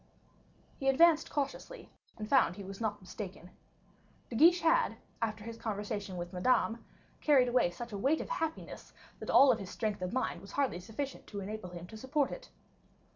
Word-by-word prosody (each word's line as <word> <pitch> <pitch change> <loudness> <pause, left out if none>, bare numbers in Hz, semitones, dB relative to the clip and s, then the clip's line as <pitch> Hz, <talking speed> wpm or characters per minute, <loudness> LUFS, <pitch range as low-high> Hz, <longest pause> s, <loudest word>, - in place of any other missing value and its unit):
He 270 - +2
advanced 320 +3 +5
cautiously, 290 - -4 0.3
and 215 -1 -5
found 235 -9 +4
he 200 - -8
was 195 +2 -8
not 210 -2 -1
mistaken. 185 -1 -8 0.8
De - - -4
Guiche 345 +8 +6
had, - - +3 0.2
after 215 -2 -2
his 230 +1 -7
conversation 205 -3 -4
with 175 +1 -6
Madame, 225 +4 +1 0.4
carried 275 -5 +5
away 245 -7 +3
such 235 +7 -8
a 205 - -4
weight 280 +8 +2
of - - -5
happiness, 325 -11 -4 0.3
that - - -7
all 275 -1 +7
of 230 - 0
his 195 -2 -7
strength 210 -3 -2
of 180 - -2
mind 230 -8 -1
was 195 0 -12
hardly 275 -10 0
sufficient 225 +9 -6
to 205 - -6
enable 200 -1 -6
him 175 -1 -8
to 220 +5 -10
support 265 +4 0
it. - - -8
225 Hz, 180 wpm, -32 LUFS, 195-275 Hz, 0.8 s, all